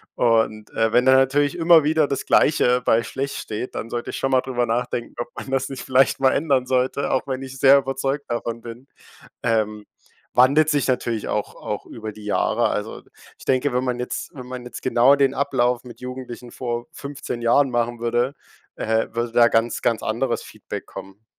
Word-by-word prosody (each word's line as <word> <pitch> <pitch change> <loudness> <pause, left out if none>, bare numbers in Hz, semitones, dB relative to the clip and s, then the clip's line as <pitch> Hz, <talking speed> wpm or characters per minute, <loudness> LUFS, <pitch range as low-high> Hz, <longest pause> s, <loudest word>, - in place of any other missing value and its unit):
Und, 110 -2 +1
äh, 115 0 0
wenn 125 +1 +4
da 130 - +6
natürlich 140 +3 +2
immer 165 -1 +6
wieder 155 0 +2
das 140 - -3
Gleiche 125 -4 +3
bei 115 +1 +3
schlecht 135 +4 -4
steht, 110 +4 -5
dann 115 - -5
sollte 120 0 -4
ich - - -6
schon 135 - -1
mal 130 - +4
drüber 125 -2 -1
nachdenken, 120 +1 -2
ob 120 - -3
man 135 - -7
das 135 0 0
nicht 135 -2 -7
vielleicht 130 +1 +2
mal 130 - +5
ändern 140 -4 +1
sollte, 130 +2 0
auch 130 - 0
wenn 130 -1 -3
ich 135 0 -8
sehr 140 0 +7
überzeugt 135 +1 -2
davon 115 0 -3
bin. 120 +3 -10 0.6
Ähm, 110 -2 0 0.5
wandelt 140 +5 +4
sich 145 -3 +1
natürlich 120 -3 -1
auch 105 - -2
auch - - -6
über 110 -1 -7
die 105 0 -13
Jahre. 105 - +1
Also - - -4 0.4
ich - - -14
denke, 135 +1 +1
wenn 125 +1 0
man 125 -1 -2
jetzt 125 - -5
wenn 125 -2 -9
man 125 -1 -7
jetzt 125 - -9
genau 130 +2 +5
den 135 -1 +2
Ablauf 125 -3 0
mit 120 -2 -12
Jugendlichen 125 -1 -8
vor 120 -1 -4
15 140 -4 -6
Jahren 130 +3 +3
machen 120 0 -1
würde, 120 +4 0 0.4
äh, 110 0 0
würde 120 0 -2
da 120 0 +6
ganz, 115 0 +1
ganz 115 -2 +1
anderes 120 +3 -1
Feedback - - -8
kommen. 95 +3 -11
125 Hz, 195 wpm, -22 LUFS, 120-135 Hz, 0.6 s, sehr